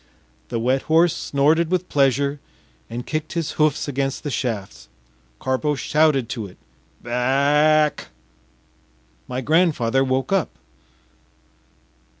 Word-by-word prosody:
The 115 Hz, -, -2 dB
wet 130 Hz, +3 st, +1 dB
horse 165 Hz, +1 st, +4 dB
snorted 155 Hz, +4 st, +1 dB
with 185 Hz, 0 st, -1 dB
pleasure 140 Hz, +1 st, +1 dB, 0.5 s
and 120 Hz, +1 st, -6 dB
kicked 155 Hz, 0 st, -4 dB
his 165 Hz, -3 st, -2 dB
hoofs 155 Hz, -1 st, +1 dB
against 135 Hz, -1 st, -2 dB
the 145 Hz, -, -3 dB
shafts. 100 Hz, -, -4 dB, 0.5 s
Karpo 130 Hz, +3 st, -1 dB
shouted 145 Hz, -2 st, +2 dB
to 110 Hz, -4 st, -4 dB
it: 90 Hz, -, -17 dB, 0.5 s
“Ba 120 Hz, -, -8 dB
ack!” 145 Hz, +5 st, +2 dB, 1.2 s
My 125 Hz, +1 st, -3 dB
grandfather 140 Hz, -5 st, +2 dB
woke 130 Hz, +4 st, -1 dB
up. 195 Hz, -4 st, -1 dB
140 Hz, 115 wpm, -22 LUFS, 125-155 Hz, 1.2 s, horse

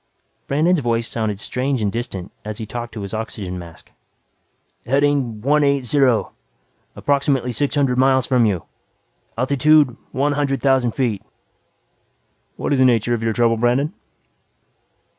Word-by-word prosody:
Brandon's 160 Hz, +5 st, +2 dB
voice 115 Hz, -3 st, -1 dB
sounded 110 Hz, -3 st, -2 dB
strange 130 Hz, +4 st, -2 dB
and 105 Hz, -2 st, 0 dB
distant 105 Hz, -6 st, -5 dB
as 105 Hz, 0 st, -6 dB
he 110 Hz, -, -5 dB
talked 120 Hz, +2 st, -6 dB
to 105 Hz, -, -5 dB
his 100 Hz, +1 st, -6 dB
oxygen 100 Hz, -4 st, -5 dB
mask. 85 Hz, -2 st, -13 dB, 1.0 s
"Heading 135 Hz, -4 st, +1 dB
one 145 Hz, +5 st, +3 dB
eight 140 Hz, -2 st, +1 dB
zero. 130 Hz, -3 st, +2 dB, 0.6 s
Approximately 140 Hz, -3 st, 0 dB
six 145 Hz, +5 st, -1 dB
hundred 135 Hz, -3 st, +1 dB
miles 130 Hz, -1 st, +3 dB
from 125 Hz, -4 st, +3 dB
you. 95 Hz, -6 st, -1 dB, 0.7 s
Altitude 140 Hz, +1 st, +3 dB, 0.2 s
one 140 Hz, +3 st, 0 dB
hundred 140 Hz, -1 st, 0 dB
thousand 130 Hz, -4 st, +2 dB
feet." 115 Hz, -7 st, -1 dB, 1.3 s
"What -, -, -2 dB
is 135 Hz, -, +1 dB
the 130 Hz, -, +5 dB
nature 120 Hz, -1 st, +2 dB
of 115 Hz, -, -1 dB
your 115 Hz, 0 st, 0 dB
trouble, 115 Hz, 0 st, +2 dB
Brandon?" 125 Hz, +7 st, +1 dB
125 Hz, 140 wpm, -20 LUFS, 115-140 Hz, 1.3 s, the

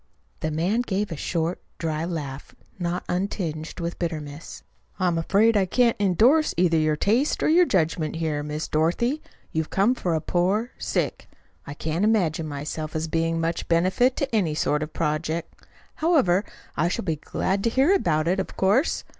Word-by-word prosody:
The 155 Hz, -, -2 dB
man 175 Hz, +9 st, +1 dB
gave 205 Hz, -4 st, -2 dB
a -, -, -2 dB
short, 165 Hz, +3 st, -2 dB, 0.2 s
dry 160 Hz, -1 st, -2 dB
laugh, 145 Hz, -5 st, -6 dB, 0.2 s
not 175 Hz, 0 st, -2 dB
untinged 175 Hz, -4 st, -3 dB
with 170 Hz, 0 st, -4 dB
bitterness. 155 Hz, -2 st, -5 dB, 0.4 s
"I'm 180 Hz, -2 st, +2 dB
afraid 205 Hz, +7 st, +3 dB
I 195 Hz, -2 st, +3 dB
can't 240 Hz, +4 st, +3 dB
endorse 230 Hz, -, +3 dB
either 170 Hz, -2 st, +3 dB
your 155 Hz, -1 st, +2 dB
taste 230 Hz, -, +1 dB
or -, -, +3 dB
your 345 Hz, +2 st, +5 dB
judgment 160 Hz, -3 st, 0 dB
there, 155 Hz, -3 st, -1 dB
Miss 150 Hz, +1 st, -4 dB
Dorothy. 210 Hz, -, +1 dB, 0.3 s
You've 160 Hz, -1 st, -2 dB
come 200 Hz, +6 st, +3 dB
for 175 Hz, -9 st, -1 dB
a -, -, +1 dB
poor 190 Hz, +9 st, 0 dB
stick. -, -, -2 dB, 0.4 s
I 140 Hz, -, -6 dB
can't 160 Hz, +5 st, -2 dB
imagine 175 Hz, -8 st, +1 dB
myself 150 Hz, +2 st, -5 dB
as 160 Hz, +1 st, -1 dB
being 165 Hz, +1 st, 0 dB
much 165 Hz, 0 st, -2 dB
benefit 185 Hz, +10 st, +2 dB
to 270 Hz, -4 st, -2 dB
any 170 Hz, -8 st, +1 dB
sort 150 Hz, -1 st, +1 dB
of 155 Hz, 0 st, -4 dB
project. 160 Hz, +1 st, -3 dB, 0.3 s
However, 260 Hz, -, +3 dB, 0.3 s
I 165 Hz, -, +2 dB
shall 180 Hz, -, -2 dB
be 160 Hz, -4 st, -1 dB
glad 195 Hz, +6 st, -2 dB
to -, -, +4 dB
hear 270 Hz, +10 st, +3 dB
about 155 Hz, -, +1 dB
it, 185 Hz, +3 st, +1 dB
of 190 Hz, -, -5 dB
course. 205 Hz, +11 st, +2 dB
170 Hz, 170 wpm, -25 LUFS, 155-205 Hz, 0.4 s, your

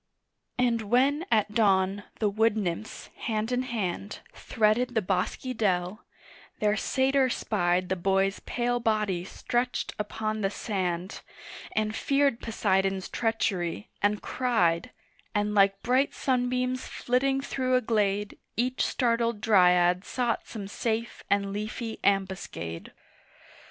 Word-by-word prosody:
And 240 Hz, -2 st, +2 dB
when 270 Hz, -, +2 dB
at 210 Hz, -1 st, +2 dB
dawn 200 Hz, -2 st, +2 dB
the 215 Hz, -, +1 dB
wood 220 Hz, +2 st, +2 dB
nymphs, 200 Hz, +1 st, -4 dB
hand 220 Hz, 0 st, -2 dB
in 250 Hz, 0 st, +1 dB
hand, 210 Hz, -5 st, -3 dB
Threaded 225 Hz, +3 st, +1 dB
the 220 Hz, -, +3 dB
bosky 195 Hz, +7 st, -1 dB
dell, 185 Hz, -2 st, 0 dB, 0.5 s
their 210 Hz, 0 st, +2 dB
satyr 265 Hz, +3 st, +2 dB
spied 180 Hz, -6 st, 0 dB
The 190 Hz, -, 0 dB
boy's 195 Hz, +2 st, +1 dB
pale 245 Hz, 0 st, -1 dB
body 210 Hz, -6 st, 0 dB
stretched 245 Hz, +6 st, -2 dB
upon 215 Hz, 0 st, -2 dB
the 195 Hz, -, +1 dB
sand, 185 Hz, -3 st, -3 dB, 0.5 s
And 215 Hz, 0 st, 0 dB
feared 275 Hz, -3 st, +2 dB
Poseidon's 195 Hz, -3 st, 0 dB
treachery, 205 Hz, -6 st, -1 dB
and 205 Hz, +1 st, +1 dB
cried, 180 Hz, -10 st, +1 dB, 0.5 s
And 205 Hz, 0 st, +1 dB
like 195 Hz, -1 st, +4 dB
bright 260 Hz, +3 st, +2 dB
sunbeams 255 Hz, -1 st, 0 dB
flitting 270 Hz, +2 st, 0 dB
through 255 Hz, -2 st, 0 dB
a 255 Hz, -, +3 dB
glade 205 Hz, -3 st, 0 dB, 0.2 s
Each 255 Hz, +2 st, +1 dB
startled 235 Hz, -3 st, +1 dB
Dryad 180 Hz, -3 st, +4 dB
sought 240 Hz, 0 st, -1 dB
some 205 Hz, -4 st, -6 dB
safe 225 Hz, +2 st, -3 dB
and 200 Hz, -1 st, +1 dB
leafy 215 Hz, +2 st, -4 dB
ambuscade. 190 Hz, -, -1 dB
215 Hz, 120 wpm, -28 LUFS, 195-245 Hz, 0.5 s, like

